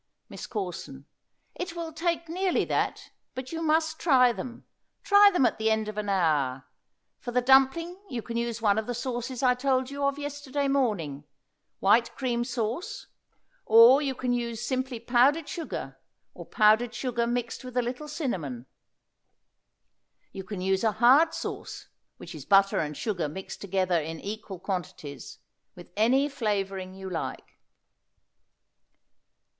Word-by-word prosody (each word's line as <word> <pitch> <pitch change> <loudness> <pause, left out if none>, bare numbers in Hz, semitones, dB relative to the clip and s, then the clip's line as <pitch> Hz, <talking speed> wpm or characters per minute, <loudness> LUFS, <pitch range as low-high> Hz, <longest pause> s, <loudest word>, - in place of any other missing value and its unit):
MISS - - -8
CORSON. 175 - -6 0.5
It 360 -1 -6
will 330 -2 -5
take 335 +1 -1
nearly 365 +3 0
that, - - -2 0.2
but 260 0 -6
you 330 0 -4
must 315 0 +1
try 255 -6 +5
them; 240 0 -8 0.4
try 405 0 +7
them 355 -9 +3
at 240 - 0
the 220 0 +2
end 220 -1 0
of 215 - -5
an 210 -1 -3
hour. 150 -9 +1 0.5
For 245 - -7
the 245 +1 +2
dumpling 270 +8 +3
you 235 -3 -4
can 230 - -6
use 235 -1 -2
one 205 0 +3
of 220 - -5
the 245 - -3
sauces 245 +1 -4
I 250 -1 +5
told 260 0 0
you 280 0 -4
of 280 0 +1
yesterday 290 -1 -3
morning, 200 - -1 0.5
white 230 +4 +3
cream 240 -3 -1
sauce, 240 - -4 0.6
or 230 +5 +8
you 270 -3 -2
can 250 0 -1
use 235 -1 -3
simply 260 -2 -2
powdered 255 +7 +3
sugar, 330 -3 -6 0.3
or - - -11
powdered 220 +2 +3
sugar 240 -2 -1
mixed 240 +1 -3
with 250 -1 -7
a 250 - +3
little 250 +5 -5
cinnamon. 170 - -4 1.7
You 190 - -7
can 190 -1 -6
use 190 +1 0
a 220 -2 +2
hard 270 +9 +5
sauce, - - -6 0.3
which - - -10
is - - -8
butter 195 0 +4
and 150 -1 -3
sugar 180 -9 -2
mixed 190 +6 -8
together 185 -3 0
in 160 +1 -6
equal 205 -2 -6
quantities, 170 -7 -6 0.4
with 175 0 -13
any 250 +7 +3
flavoring 195 -8 -3
you 190 0 -8
like. 170 -3 -6
240 Hz, 150 wpm, -27 LUFS, 195-270 Hz, 1.7 s, or